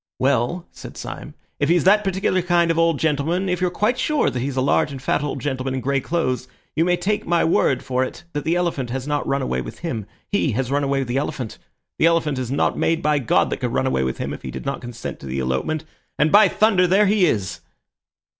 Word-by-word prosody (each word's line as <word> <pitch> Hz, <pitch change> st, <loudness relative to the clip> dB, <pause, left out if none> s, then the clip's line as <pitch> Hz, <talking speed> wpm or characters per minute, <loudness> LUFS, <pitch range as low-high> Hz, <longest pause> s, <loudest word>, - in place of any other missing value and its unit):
"Well," 135 Hz, +6 st, +1 dB
said -, -, -11 dB
Syme, -, -, -7 dB, 0.2 s
"if -, -, +1 dB
he's 175 Hz, 0 st, +4 dB
that 210 Hz, +3 st, +5 dB
particular 190 Hz, -1 st, +1 dB
kind 170 Hz, -1 st, +2 dB
of 165 Hz, -, 0 dB
old 165 Hz, -2 st, +3 dB
gentleman, 160 Hz, +5 st, 0 dB
if 180 Hz, -1 st, -1 dB
you're 180 Hz, -, +2 dB
quite 215 Hz, +7 st, 0 dB
sure 300 Hz, +3 st, +1 dB
that 125 Hz, -, -3 dB
he's 135 Hz, +2 st, -3 dB
a -, -, 0 dB
large 140 Hz, +2 st, +2 dB
and 135 Hz, -, -6 dB
fat 130 Hz, -, 0 dB
old 145 Hz, -, -3 dB
gentleman 130 Hz, -2 st, -2 dB
in -, -, -1 dB
grey 135 Hz, +1 st, 0 dB
clothes, 130 Hz, -6 st, -1 dB, 0.3 s
you 160 Hz, -, +3 dB
may 180 Hz, +1 st, +2 dB
take 210 Hz, +3 st, -1 dB
my 170 Hz, 0 st, +3 dB
word 135 Hz, -5 st, +2 dB
for 130 Hz, 0 st, 0 dB
it 130 Hz, -, -6 dB
that 145 Hz, -, -2 dB
the 165 Hz, -, +1 dB
elephant 170 Hz, -8 st, -1 dB
has 130 Hz, +1 st, -3 dB
not 145 Hz, 0 st, -1 dB
run 135 Hz, 0 st, 0 dB
away 65 Hz, -, -1 dB
with -, -, -9 dB
him. 115 Hz, -, -4 dB, 0.2 s
He 180 Hz, -, 0 dB
has 130 Hz, +2 st, -1 dB
run 145 Hz, +1 st, +1 dB
away 140 Hz, 0 st, 0 dB
with 135 Hz, -, -3 dB
the 120 Hz, +2 st, -1 dB
elephant. 130 Hz, -5 st, -3 dB, 0.4 s
The 165 Hz, -, +5 dB
elephant 155 Hz, -5 st, +1 dB
is 125 Hz, -2 st, -3 dB
not 140 Hz, -, +1 dB
made 165 Hz, +1 st, +1 dB
by 150 Hz, -1 st, +2 dB
God 120 Hz, -, +2 dB
that -, -, -1 dB
could -, -, -3 dB
run -, -, +1 dB
away 65 Hz, 0 st, +1 dB
with 65 Hz, 0 st, -2 dB
him -, -, -3 dB
if -, -, -8 dB
he -, -, -6 dB
did -, -, -7 dB
not 140 Hz, -, -3 dB
consent 120 Hz, -1 st, -7 dB
to 70 Hz, -, -9 dB
the 65 Hz, +1 st, -3 dB
elopement. 65 Hz, -, -1 dB, 0.3 s
And, 150 Hz, +1 st, +3 dB
by 205 Hz, 0 st, +7 dB
thunder, 190 Hz, -2 st, +3 dB
there 195 Hz, +4 st, +4 dB
he 200 Hz, -2 st, +4 dB
is!" 95 Hz, -, -1 dB
150 Hz, 250 wpm, -22 LUFS, 130-175 Hz, 0.4 s, by